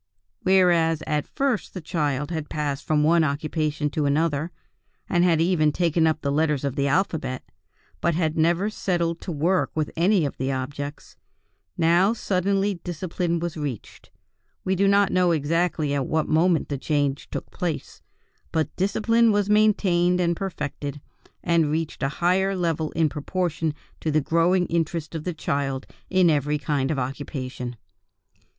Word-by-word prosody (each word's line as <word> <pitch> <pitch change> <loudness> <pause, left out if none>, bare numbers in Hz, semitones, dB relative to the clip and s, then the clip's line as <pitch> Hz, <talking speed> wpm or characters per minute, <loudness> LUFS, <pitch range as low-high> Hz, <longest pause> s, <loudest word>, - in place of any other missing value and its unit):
"Whereas 175 -4 +3
at 150 -1 -1
first 270 -8 -1
the - - -3
child 150 -3 -2
had 160 -3 -4
passed 145 -2 -2
from 150 -1 +2
one 165 +2 +4
occupation 150 0 -1
to 150 -1 0
another, 150 +1 +1 0.6
and 175 0 +2
had 170 -3 +3
even 165 -3 +3
taken 165 0 +2
up 160 0 0
the 140 - -1
letters 150 -1 +1
of 140 -2 -2
the 140 +1 +1
alphabet, 155 -5 -1 0.6
but 170 -2 +1
had 160 -2 0
never 170 +6 +2
settled 170 -5 -1
to 180 - -5
work 170 +5 +1
with 155 -2 -1
any 185 +3 +3
one 145 - +1
of - - -15
the 130 +1 -1
objects, 140 +2 -5 0.6
now 175 +5 +4
suddenly 195 -2 0
discipline 175 0 -2
was 170 +1 -2
established. 145 -8 -6 0.5
We 190 - 0
do 195 +2 +2
not 200 0 +4
know 180 -1 +3
exactly 155 0 0
at 140 -2 -1
what 160 0 0
moment 160 0 +2
the 140 -2 -3
change 145 -1 -1
took - - -6
place, 170 -4 -4 0.5
but 160 -1 -1
discipline 230 +4 +2
was 205 0 +1
maintained 185 -4 +3
and 170 -1 +1
perfected, 150 -6 -5 0.4
and 170 -3 +2
reached 160 +1 -2
a 135 - +1
higher 190 +2 +3
level 165 -3 -1
in 160 -1 +2
proportion 160 +1 -2 0.2
to 160 - -2
the 155 0 +3
growing 170 +4 +2
interest 165 -1 -2
of 160 -2 -5
the 180 - -2
child 140 -3 -2 0.2
in 185 -3 +4
every 150 0 +1
kind 145 -2 -1
of 155 - -1
occupation. 130 -2 -4
160 Hz, 160 wpm, -24 LUFS, 145-180 Hz, 0.6 s, one